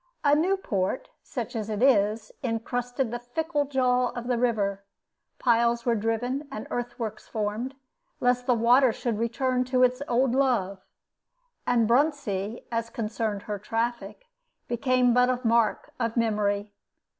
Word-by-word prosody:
A 290 -1 +4
new 355 +6 +3
port, 200 - -2
such - - -5
as 220 -1 -3
it 215 +2 -1
is, 215 -4 +3
incrusted 245 +1 -2
the 240 - -3
fickle 290 +5 -1
jaw 255 -2 +2
of 240 -1 -6
the 245 -1 0
river; 200 -5 0 0.5
piles 235 -1 +2
were 240 - +3
driven 235 +6 -1
and 215 - -5
earth 245 0 -3
works 220 -3 -5
formed, 220 +5 -3 0.4
lest 250 0 +1
the 250 - +4
water 245 +3 +5
should 225 -1 -3
return 250 +2 0
to 255 0 +2
its 250 +1 +2
old 250 +1 +2
love; 230 -8 +1 0.9
and 235 -2 +3
Bruntsea, 235 -6 0
as 230 0 -1
concerned 220 -2 -3
her 205 -1 -4
traffic, 235 - -3 0.4
became 250 0 +2
but 250 +1 +4
a 250 -1 +1
mark 230 -1 +2
of 230 -1 -1
memory. 210 -2 0
235 Hz, 145 wpm, -27 LUFS, 220-255 Hz, 0.9 s, water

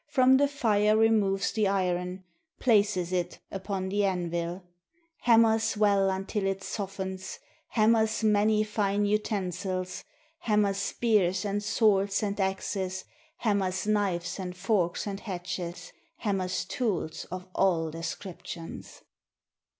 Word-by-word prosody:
From 265 -3 +5
the 285 +1 +4
fire 215 -7 +2
removes 210 -3 +3
the 215 -2 +1
iron, 180 -1 -1 0.4
Places 205 -6 +2
it 175 -1 -1
upon 190 -1 -3
the 205 +1 +1
anvil, 175 -1 -2 0.6
Hammers 225 -2 +4
well 200 -2 +3
until 195 +1 -2
it 195 0 -2
softens, 190 -2 -5 0.3
Hammers 220 0 +2
many 215 0 +3
fine 205 -1 0
utensils, 190 -3 -2 0.4
Hammers 210 - +1
spears, 200 -3 +1
and 205 0 -1
swords, 205 -2 +2
and 205 0 -2
axes, 190 -1 -2 0.3
Hammers 195 - 0
knives, 195 -4 0
and 180 -1 -5
forks, 180 -2 0
and 200 -1 -4
hatchets, 180 -3 -5 0.3
Hammers 185 -4 -1
tools 190 -9 -2
of 185 0 -7
all 165 -4 +2
descriptions. 165 0 -7
195 Hz, 110 wpm, -28 LUFS, 185-215 Hz, 0.6 s, From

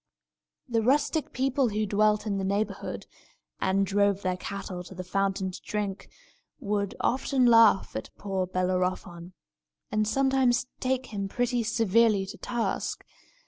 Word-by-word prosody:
The 230 -3 +1
rustic 290 +6 +1
people 265 -1 +1
who 215 +1 -1
dwelt 210 +1 +2
in 200 -2 -1
the - - -2
neighbourhood, 200 +3 -2 0.5
and 195 +1 +2
drove 200 0 +1
their 185 -1 0
cattle 185 -1 -6
to 190 - -11
the 185 - -5
fountain 195 +1 -1
to - - -9
drink, 205 -2 -4 0.5
would 205 -2 -2
often 260 0 +1
laugh 230 -4 +5
at 110 - -4
poor 190 -2 -2
Bellerophon, 180 -1 -2 0.6
and 215 0 +1
sometimes 265 0 +2
take 260 -2 -2
him 200 -1 -2
pretty 245 +3 0
severely 225 -2 +3
to 190 - -9
task. 240 -2 -2
210 Hz, 140 wpm, -27 LUFS, 190-240 Hz, 0.6 s, laugh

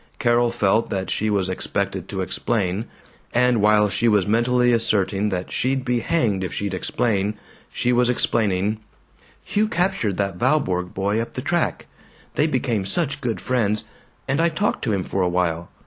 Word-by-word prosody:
Carol 120 0 +3
felt 110 -1 +1
that 95 -1 -3
she 110 - 0
was 100 -3 +1
expected 95 - -2
to - - -3
explain; 105 -2 -1 0.5
and 125 -2 +3
while 105 0 +4
she 115 +3 0
was 105 -4 +3
mentally 120 +3 +3
asserting 105 -3 +2
that 90 -2 -4
she'd 130 0 0
be 125 -1 +1
hanged 110 - 0
if 90 - -3
she'd 100 -1 -3
explain, 105 +1 0 0.4
she 125 - 0
was 125 0 +3
explaining: 105 -3 +1 0.6
"Hugh 215 +1 +1
captured 180 - 0
that 100 -3 -2
Valborg 90 -12 0
boy 100 +3 0
up 115 - -6
the - - -4
track. - - -1 0.5
They 150 - +2
became 125 -7 0
such 140 - -1
good 120 -4 -2
friends. 110 -4 0 0.4
And 140 +4 +1
I 170 - +3
talked 190 +6 -1
to 115 - 0
him 95 -3 0
for 95 - -2
a 90 - +2
while. 85 -2 -1
110 Hz, 170 wpm, -22 LUFS, 95-125 Hz, 0.6 s, while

